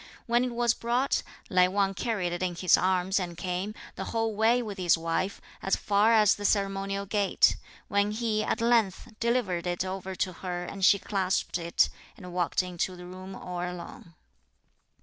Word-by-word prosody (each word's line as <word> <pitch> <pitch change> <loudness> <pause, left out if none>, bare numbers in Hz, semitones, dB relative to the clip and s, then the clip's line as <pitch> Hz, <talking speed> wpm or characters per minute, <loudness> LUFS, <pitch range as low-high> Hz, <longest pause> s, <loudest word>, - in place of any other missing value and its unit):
(When 240 +1 +2
it 250 -2 -3
was 240 -1 +3
brought,) 245 +4 0 0.3
Lai 180 -2 +4
Wang 195 +1 +1
carried 195 -4 -2
it 175 - -4
in 180 -1 -1
his 180 +1 +5
arms 185 +1 +1
and 175 -2 -5
came, 185 +4 -3 0.2
the - - -4
whole 225 -1 -1
way 225 +3 +3
with 205 -3 -6
his 175 -2 +4
wife, 165 +4 -2 0.2
as 195 - +2
far 205 +2 +3
as 215 -3 +6
the 205 - -7
ceremonial 195 -1 0
gate; 200 0 +3 0.3
when 200 0 +2
he, 215 0 -1
at 230 - -1
length, 230 -2 +1
delivered 230 -8 0
it 175 +1 -1
over 190 0 -5
to 185 0 -1
her 175 0 -5
and 195 +1 -7
she 200 - +7
clasped 190 -3 -1
it, 170 0 +2 0.3
and 180 -5 -10
walked 180 +1 +1
into 180 0 -3
the 180 0 -10
room 185 +1 -9
all 180 -1 -5
alone. 175 -1 -7
195 Hz, 180 wpm, -28 LUFS, 180-215 Hz, 0.3 s, she